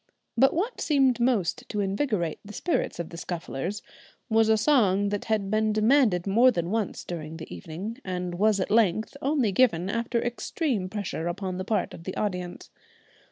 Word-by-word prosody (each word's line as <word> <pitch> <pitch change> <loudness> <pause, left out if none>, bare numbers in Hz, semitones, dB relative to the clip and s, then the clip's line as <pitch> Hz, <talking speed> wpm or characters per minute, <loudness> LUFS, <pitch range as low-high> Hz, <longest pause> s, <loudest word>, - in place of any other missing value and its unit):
But 270 +3 +4
what 420 +9 -2
seemed 270 -5 +3
most 240 -1 0
to 210 - -3
invigorate 195 - -1
the 210 - -10
spirits 350 - -1
of 170 - -4
the 170 - -8
Scufflers 175 +2 -4 0.5
was 220 0 +4
a 220 - +5
song 205 -6 +3
that 205 0 -3
had 210 -3 0
been 215 0 +2
demanded 215 -4 +3
more 230 +6 +5
than 175 -6 -1
once 220 -3 -2
during 160 -2 -6
the 160 - -8
evening 185 - -7
and 180 -1 -3
was 205 +3 +2
at 185 - -2
length 220 +1 +2
only 270 -6 +1
given 190 -4 +2
after 230 +1 -1
extreme 240 - -2
pressure 195 -5 -4
upon 185 +1 -3
the 185 - -3
part 215 +1 -1
of 165 - -11
the 190 - -5
audience. 180 -4 -4
205 Hz, 175 wpm, -27 LUFS, 180-235 Hz, 0.5 s, a